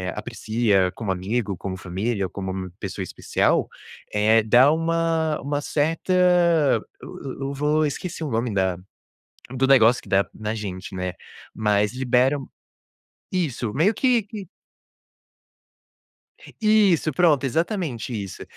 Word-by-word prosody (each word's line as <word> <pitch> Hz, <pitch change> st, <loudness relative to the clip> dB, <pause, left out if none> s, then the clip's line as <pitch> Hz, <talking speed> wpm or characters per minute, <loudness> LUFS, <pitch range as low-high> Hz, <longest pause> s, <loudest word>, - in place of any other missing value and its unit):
aprecia 110 Hz, -3 st, 0 dB
como 110 Hz, -4 st, -3 dB
amigo, 100 Hz, +3 st, -2 dB
como 95 Hz, +1 st, -6 dB
família, 100 Hz, +3 st, -2 dB
ou -, -, -5 dB
como 95 Hz, -1 st, -5 dB
pessoa 95 Hz, -1 st, -5 dB
especial, -, -, 0 dB, 0.5 s
eh, 110 Hz, +2 st, +4 dB
dá 125 Hz, +6 st, +5 dB
uma 165 Hz, -1 st, 0 dB
uma 145 Hz, +1 st, -2 dB
certa, 155 Hz, +5 st, -1 dB, 0.9 s
eu -, -, -10 dB, 0.2 s
eu 135 Hz, +1 st, -3 dB
vou 150 Hz, +2 st, +1 dB
esqueci 165 Hz, +3 st, -4 dB
o 150 Hz, -, -4 dB
nome 115 Hz, +1 st, -1 dB
da 95 Hz, -2 st, 0 dB, 0.8 s
do 130 Hz, +1 st, +2 dB
negócio, 125 Hz, -3 st, +5 dB
que -, -, -16 dB
dá 100 Hz, +1 st, +2 dB
na 110 Hz, +1 st, -4 dB
gente, 95 Hz, -3 st, -6 dB
né, 90 Hz, 0 st, -3 dB, 0.4 s
mas 105 Hz, -1 st, +1 dB
libera 130 Hz, +2 st, +2 dB, 1.0 s
isso 140 Hz, -, -2 dB
meio 180 Hz, +10 st, +3 dB
que 245 Hz, 0 st, +2 dB
que 205 Hz, -3 st, -9 dB, 2.1 s
Isso 210 Hz, -8 st, +3 dB
pronto, 150 Hz, -3 st, +3 dB
exatamente 155 Hz, -, -2 dB
isso, 100 Hz, -4 st, -6 dB
120 Hz, 125 wpm, -23 LUFS, 100-155 Hz, 2.1 s, dá